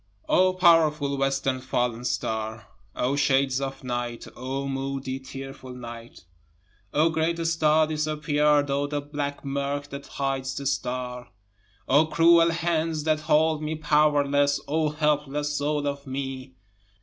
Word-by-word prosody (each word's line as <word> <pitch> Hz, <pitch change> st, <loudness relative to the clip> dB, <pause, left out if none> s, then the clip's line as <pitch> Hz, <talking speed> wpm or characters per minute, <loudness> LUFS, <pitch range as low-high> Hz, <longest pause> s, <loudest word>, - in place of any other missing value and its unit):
2 -, -, -3 dB
O 185 Hz, 0 st, +5 dB
powerful 155 Hz, -5 st, +4 dB
western 135 Hz, -1 st, 0 dB
fallen 125 Hz, -2 st, -1 dB
star! 110 Hz, -2 st, -3 dB, 0.3 s
O 130 Hz, +3 st, 0 dB
shades 135 Hz, -1 st, +2 dB
of 135 Hz, 0 st, -5 dB
night 120 Hz, -1 st, -4 dB
O 135 Hz, +2 st, -4 dB
moody, 135 Hz, -1 st, -3 dB
tearful 135 Hz, -1 st, -9 dB
night! 115 Hz, -5 st, -10 dB, 0.7 s
O 155 Hz, +3 st, +3 dB
great 160 Hz, +1 st, 0 dB
star 155 Hz, -1 st, +3 dB
disappear'd 150 Hz, -1 st, +1 dB
O 140 Hz, +1 st, 0 dB
the 145 Hz, 0 st, -2 dB
black 145 Hz, 0 st, -5 dB
murk 140 Hz, +1 st, -2 dB
that 140 Hz, 0 st, -8 dB
hides 135 Hz, -1 st, -2 dB
the 140 Hz, -, -5 dB
star! 125 Hz, -2 st, -3 dB, 0.6 s
O 145 Hz, +4 st, +4 dB
cruel 165 Hz, +1 st, +5 dB
hands 165 Hz, -2 st, -1 dB
that 155 Hz, 0 st, +1 dB
hold 155 Hz, 0 st, +2 dB
me 155 Hz, +1 st, -2 dB
powerless 145 Hz, -2 st, +2 dB
O 155 Hz, +1 st, +1 dB
helpless 150 Hz, -1 st, 0 dB
soul 145 Hz, 0 st, -1 dB
of 140 Hz, 0 st, -4 dB
me! 130 Hz, -1 st, -5 dB
140 Hz, 135 wpm, -26 LUFS, 135-155 Hz, 0.7 s, O